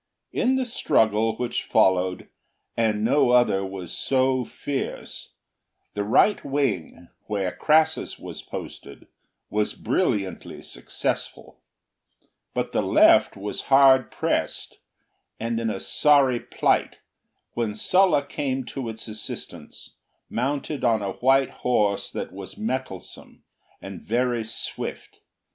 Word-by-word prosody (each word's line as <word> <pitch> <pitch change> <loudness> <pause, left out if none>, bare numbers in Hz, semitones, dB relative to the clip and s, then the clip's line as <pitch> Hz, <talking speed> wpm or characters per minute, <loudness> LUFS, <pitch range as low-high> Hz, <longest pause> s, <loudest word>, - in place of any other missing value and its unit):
In 260 +2 +1
the 260 -1 0
struggle 110 - +2
which 125 -1 -2
followed, 95 -1 +2 0.5
and 110 -2 +1
no 125 +2 +3
other 120 -6 +4
was 95 -3 -6
so 130 -1 +1
fierce, 140 -2 -5 0.6
the 105 - -2
right 120 - +3
wing, 110 - -2 0.2
where 100 -4 -1
Crassus 155 - +2
was - - -8
posted, - - -9 0.5
was 105 0 0
brilliantly 95 -4 -2
successful; - - -4 1.0
but - - -1
the - - +1
left - - +5
was 100 +1 -5
hard 135 -1 +6
pressed - - -2 0.6
and 115 0 -2
in 115 -1 -1
a 100 -3 -3
sorry 140 -2 +3
plight, - - 0 0.6
when 115 -3 -2
Sulla 180 - +3
came 135 -2 -2
to 130 -4 -4
its 110 +1 -7
assistance, 110 0 -8 0.3
mounted 140 +3 -2
on 115 -4 +2
a 100 - -2
white 135 +5 +2
horse 105 -5 +1
that - - -6
was 95 0 -9
mettlesome 130 - -6 0.4
and 95 -1 -9
very 120 0 0
swift. 110 +1 -6
115 Hz, 115 wpm, -24 LUFS, 105-135 Hz, 1.0 s, hard